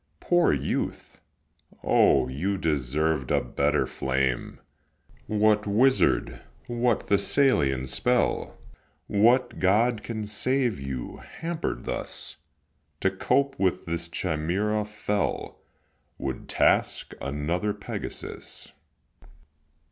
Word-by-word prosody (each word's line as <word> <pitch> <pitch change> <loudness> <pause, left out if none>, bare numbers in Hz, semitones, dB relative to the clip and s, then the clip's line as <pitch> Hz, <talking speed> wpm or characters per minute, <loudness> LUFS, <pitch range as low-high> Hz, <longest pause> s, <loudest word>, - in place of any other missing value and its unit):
Poor 175 -1 +3
youth! - - -3 0.6
O, - - +4
you 90 +10 -2
deserved 75 -2 0
a - - +3
better 70 +4 +1
flame! 65 -1 -1 0.7
What 105 0 +2
wizard, 105 - +2 0.2
what 120 -1 0
Thessalian 100 - +2
spell, 125 - 0 0.5
What 120 +4 +3
god 105 +4 +3
can 110 -2 -4
save 120 - 0
you, 70 -2 -5
hamper'd 165 - -4
thus? - - -3 0.6
To 95 - +2
cope 135 +8 +1
with 95 -2 +1
this 85 0 -2
Chimaera 95 +7 -1
fell 105 -1 -2 0.6
Would 65 -1 -5
task - - +2
another 75 +9 -1
Pegasus. - - -7
100 Hz, 90 wpm, -26 LUFS, 75-120 Hz, 0.7 s, O